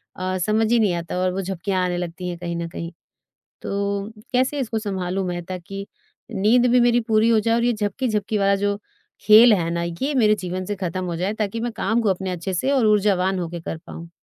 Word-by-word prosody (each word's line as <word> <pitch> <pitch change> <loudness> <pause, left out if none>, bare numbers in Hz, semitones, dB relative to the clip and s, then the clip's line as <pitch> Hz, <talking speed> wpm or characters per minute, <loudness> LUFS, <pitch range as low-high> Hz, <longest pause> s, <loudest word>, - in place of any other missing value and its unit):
अ, 185 0 -2
समझ 215 +4 +1
ही 240 - +4
नहीं 205 -5 +2
आता 170 -1 -4
है 180 - -1
और 185 0 +1
वो 195 - -2
झपकियाँ 190 0 -2
आने 180 -1 -1
लगती 175 +1 -4
हैं 175 - -5
कहीं 170 0 -4
न 170 0 -3
कहीं। 165 0 -6 0.7
तो 200 +1 -2 0.2
कैसे 260 +3 +1
इसको 225 -4 -2
संभालूँ 190 -2 -2
मैं? 175 -1 -3
ताकि 185 +2 -6 0.5
नींद 225 +4 +3
भी 250 - +5
मेरी 240 0 +4
पूरी 220 0 +3
हो 225 -1 +4
जाए 225 +2 +1
और 235 - +1
ये 240 0 +2
झपकी-झपकी 215 0 -1
वाला 200 0 +3
जो 205 +1 -1 0.4
खेल 220 +2 +8
है 170 -4 0
ना, 170 0 -1
ये 170 - -2
मेरे 215 -4 +4
जीवन 185 -1 -4
से 205 - -3
खत्म 185 -1 -3
हो 175 -1 -3
जाए 185 +5 -1
ताकि 215 0 -2
मैं 240 +1 -2
काम 225 +4 +1
को 220 - +1
अपने 190 0 -1
अच्छे 180 +2 -4
से 225 +10 0
और 265 -5 +3
ऊर्जावान 195 -3 +2
हो 175 - -2
के 170 0 -6
कर 165 - -5
पाऊँ। 165 0 -9
195 Hz, 230 wpm, -22 LUFS, 180-220 Hz, 0.7 s, खेल